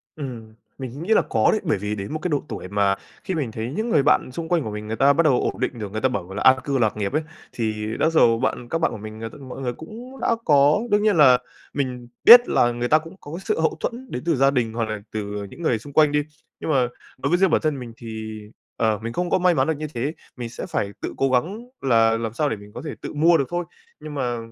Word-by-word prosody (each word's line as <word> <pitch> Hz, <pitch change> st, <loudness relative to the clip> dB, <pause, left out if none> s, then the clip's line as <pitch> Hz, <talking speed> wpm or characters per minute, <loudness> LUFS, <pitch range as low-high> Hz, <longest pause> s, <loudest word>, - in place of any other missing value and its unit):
Ừm, 120 Hz, -7 st, -7 dB, 0.2 s
mình 135 Hz, +4 st, -6 dB
nghĩ 220 Hz, +4 st, +2 dB
là -, -, +5 dB
có 110 Hz, -1 st, +3 dB
đấy. 215 Hz, -, 0 dB
Bởi 155 Hz, -, +1 dB
vì 105 Hz, +2 st, -3 dB
đến 100 Hz, +9 st, -5 dB
một 155 Hz, -, -2 dB
cái 180 Hz, -, -2 dB
độ 145 Hz, -2 st, 0 dB
tuổi -, -, -6 dB
mà 100 Hz, 0 st, +2 dB, 0.3 s
khi 190 Hz, -, -3 dB
mình 135 Hz, -8 st, -2 dB
thấy 115 Hz, +3 st, -4 dB
những 220 Hz, +8 st, -2 dB
người 140 Hz, -, +3 dB
bạn 145 Hz, -, +3 dB
xung 160 Hz, +4 st, -6 dB
quanh 170 Hz, -5 st, +2 dB
của 110 Hz, -, -4 dB
mình, 105 Hz, 0 st, -6 dB
người 110 Hz, -, -2 dB
ta 140 Hz, +3 st, +5 dB
bắt 170 Hz, -, +3 dB
đầu 135 Hz, -5 st, +3 dB
ổn -, -, -2 dB
định 120 Hz, -, -2 dB
được, 100 Hz, -2 st, -5 dB
người 110 Hz, -, -3 dB
ta 130 Hz, -, +3 dB
bảo 95 Hz, -4 st, -4 dB
là 105 Hz, -, -3 dB
an 130 Hz, 0 st, +7 dB
cư 140 Hz, -2 st, 0 dB
lạc 110 Hz, -3 st, +1 dB
nghiệp 100 Hz, +2 st, -2 dB
ấy, 155 Hz, +1 st, +1 dB, 0.3 s
thì 110 Hz, -2 st, -2 dB
đó 160 Hz, -, +3 dB
dầu 115 Hz, -8 st, +4 dB
bạn 125 Hz, -2 st, -2 dB
các 165 Hz, -, 0 dB
bạn 165 Hz, -, +1 dB
của -, -, -6 dB
mình, 110 Hz, +1 st, -9 dB
ờ, 115 Hz, -, -4 dB
t -, -, -21 dB
mọi 135 Hz, -2 st, -9 dB
người 125 Hz, -2 st, -2 dB
cũng 240 Hz, -, -10 dB
đã 230 Hz, -, +2 dB
có 145 Hz, +4 st, +5 dB
đương 205 Hz, 0 st, +3 dB
nhiên 210 Hz, -4 st, +3 dB
là 130 Hz, -4 st, +7 dB, 0.4 s
mình 125 Hz, -3 st, -3 dB, 0.2 s
biết 240 Hz, +1 st, +10 dB
là 120 Hz, 0 st, +3 dB
người 120 Hz, +1 st, -2 dB
ta 155 Hz, -, +5 dB
cũng 165 Hz, +4 st, -12 dB
có 145 Hz, -, -10 dB
cái 180 Hz, -, -5 dB
sự -, -, 0 dB
hậu 160 Hz, 0 st, +1 dB
thuẫn 250 Hz, +2 st, -5 dB
đến 125 Hz, -, -4 dB
từ 165 Hz, -3 st, +2 dB
gia 135 Hz, +1 st, +4 dB
đình 115 Hz, -4 st, 0 dB
hoặc 115 Hz, -1 st, -1 dB
là 110 Hz, -1 st, -3 dB
từ 105 Hz, -1 st, -4 dB
những 170 Hz, -, -12 dB
người 120 Hz, -9 st, +1 dB
xung 140 Hz, +4 st, -12 dB
quanh 150 Hz, -2 st, +5 dB
đi. 150 Hz, 0 st, +2 dB, 0.4 s
Nhưng -, -, -5 dB
mà 130 Hz, -3 st, +3 dB, 0.3 s
đối 140 Hz, +2 st, -2 dB
với 175 Hz, -, +3 dB
riêng 190 Hz, -2 st, +4 dB
bản -, -, +2 dB
thân 150 Hz, -3 st, -1 dB
mình 120 Hz, -2 st, -8 dB
thì, 110 Hz, -2 st, -7 dB, 0.4 s
ờ, 110 Hz, -2 st, +1 dB
mình 115 Hz, +1 st, -4 dB
không 180 Hz, 0 st, -1 dB
có -, -, +2 dB
may 180 Hz, 0 st, +4 dB
mắn 160 Hz, -, +1 dB
được 160 Hz, -2 st, 0 dB
như 155 Hz, 0 st, -4 dB
thế, 135 Hz, +7 st, -2 dB, 0.2 s
mình 120 Hz, -2 st, -5 dB
sẽ 115 Hz, -, -6 dB
phải 100 Hz, 0 st, -2 dB
tự -, -, -4 dB
cố 135 Hz, -, +2 dB
gắng 185 Hz, -, 0 dB, 0.2 s
là 115 Hz, -3 st, +3 dB
làm 115 Hz, -1 st, -4 dB
sao 145 Hz, +3 st, 0 dB
để -, -, -1 dB
mình 105 Hz, 0 st, -13 dB
có -, -, -7 dB
thể -, -, -4 dB
tự -, -, -6 dB
mua 165 Hz, +3 st, +4 dB
được 140 Hz, -, 0 dB
thôi. 175 Hz, 0 st, -2 dB, 0.3 s
Nhưng 150 Hz, -, -8 dB
mà 125 Hz, -4 st, -1 dB
130 Hz, 290 wpm, -23 LUFS, 110-160 Hz, 0.4 s, biết